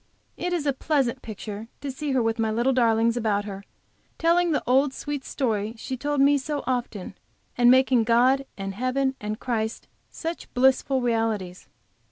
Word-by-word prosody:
It 355 - -3
is 340 -4 -1
a 280 - +2
pleasant 265 -3 0
picture 215 0 -7
to 280 - -4
see 285 +2 -4
her 255 -2 +2
with 225 +1 -1
my 220 -1 +1
little 235 +5 +1
darlings 230 -2 +3
about 210 -4 0
her, 200 -1 -7 0.5
telling 340 +1 +3
the 300 - 0
old 265 +2 +3
sweet 290 -2 -4
story 220 -4 -2
she 260 +3 -5
told 290 +2 -2
me 280 +1 +5
so 290 +2 -3
often, 240 -7 -3 0.4
and 240 0 +5
making 260 -2 +5
God 255 +4 +3
and 195 -1 -4
Heaven 255 +4 0
and 215 +1 -4
Christ 225 -3 -3 0.2
such 330 +1 -6
blissful 265 +1 +3
realities. 225 -6 -1
250 Hz, 170 wpm, -25 LUFS, 225-275 Hz, 0.5 s, me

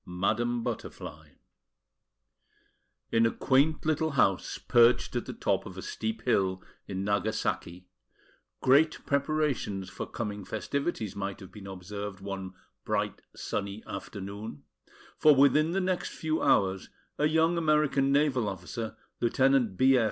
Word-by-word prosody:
MADAM 120 +7 -1
BUTTERFLY 75 -1 -6 1.8
In 115 0 +4
a - - 0
quaint 145 +4 +2
little 155 0 +1
house 95 -8 +2
perched 120 0 +4
at - - -2
the - - -4
top - - 0
of - - -10
a - - -6
steep 110 +1 -4
hill 95 -6 +1 0.2
in 95 -1 -3
Nagasaki, 100 -3 -1 0.7
great 150 +5 +4
preparations 140 -10 0
for - - -5
coming 105 -3 -4
festivities 110 - -3
might 100 -1 -4
have 95 -3 -11
been 100 -2 -10
observed 100 +1 -6
one 95 -1 -6 0.3
bright - - -1
sunny 100 +1 -4
afternoon; 100 -4 -7 0.6
for 150 -1 +7
within 145 +3 +5
the 185 +3 0
next 185 -1 -1
few 160 0 -2
hours, 95 -1 +2 0.3
a 150 - +4
young 160 +2 +3
American 150 -4 +2
naval 140 -6 +2
officer, 110 +4 -6 0.2
Lieutenant 125 -4 +2
B. 130 0 +5
115 Hz, 130 wpm, -29 LUFS, 100-140 Hz, 1.8 s, for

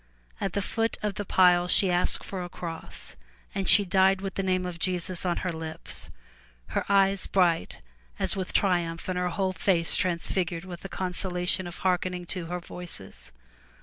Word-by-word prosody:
At 195 - -2
the 200 - -1
foot 225 +2 -1
of 210 -1 0
the 205 +1 -5
pile, 180 -1 +5
she 185 +1 +5
asked 175 0 +1
for 190 -2 -4
a 175 - -6
cross, 165 -2 -7 0.4
and 195 -2 0
she 205 - +8
died 190 +1 +4
with 195 0 -4
the - - -1
name 185 -1 0
of 175 -2 -5
Jesus 180 0 0
on 175 - +1
her 180 - -1
lips, 160 0 -6 0.6
her - - -1
eyes 195 -1 +3
bright 175 -4 +1 0.4
as - - +2
with 190 -1 -3
triumph 175 -4 +1
and 185 -1 -1
her 180 0 0
whole 190 +1 -1
face 170 -2 +1
transfigured 175 -1 -1
with 175 -2 -7
the 195 - -7
consolation 180 0 -1
of 175 - -8
hearken 180 0 +1
ing 180 0 -6
to 175 -1 -4
her 180 +1 -3
Voices. 170 - -7
180 Hz, 180 wpm, -27 LUFS, 175-190 Hz, 0.6 s, she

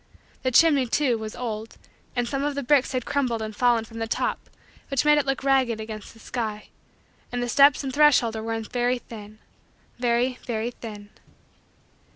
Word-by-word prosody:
The 260 - +1
chimney, 280 0 +5
too, 245 -2 +1
was 215 0 -6
old 225 -2 -5 0.4
and 245 -1 0
some 275 +2 -2
of 290 -1 -1
the 280 - -2
bricks 275 +1 +3
had 255 -2 -2
crumbled 255 -5 0
and 215 -1 -5
fallen 235 -1 +2
from 230 0 -10
the 225 - -2
top - - -2 0.4
which 275 0 0
made 300 0 +6
it 280 - -2
look 270 0 -1
ragged 260 -5 +2
against 215 -1 -7
the - - -17
sky. 220 -3 -5 0.6
And 245 0 -2
the - - -2
steps 280 +3 +5
and 265 -1 -4
threshold 285 -6 +4
were 220 - -4
worn 225 0 -3
very 245 +2 0
thin 215 -3 -11 0.6
very, 245 +1 +1
very, 235 -1 -2
thin. 210 -4 -10
240 Hz, 185 wpm, -25 LUFS, 225-270 Hz, 0.6 s, made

